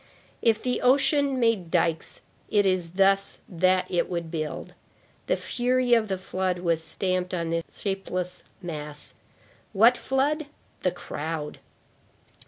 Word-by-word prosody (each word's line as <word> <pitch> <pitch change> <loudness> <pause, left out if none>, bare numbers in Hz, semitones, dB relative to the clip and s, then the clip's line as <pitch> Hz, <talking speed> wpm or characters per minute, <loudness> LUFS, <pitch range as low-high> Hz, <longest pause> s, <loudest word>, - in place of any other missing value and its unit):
If 225 -2 +2
the 250 -1 0
ocean 275 +1 +3
made 225 -8 +2
dikes, 165 -1 0 0.3
it 205 -1 +3
is 180 -3 0
thus 195 +1 +3
that 185 +1 +2
it 175 - 0
would 170 -2 -3
build. 155 -2 -4 0.5
The - - +2
fury 250 0 +1
of 225 -2 +4
the 190 -1 -1
flood 185 0 -2
was 170 -2 0
stamped 185 +2 -1
upon 165 -1 -2
this 165 0 -1 0.2
shapeless 185 -2 -3 0.2
mass. 150 -3 -7 0.6
What 230 +5 +6
flood? 285 +3 0 0.3
The 180 - +2
crowd. 160 -3 -5
185 Hz, 130 wpm, -26 LUFS, 170-230 Hz, 0.6 s, What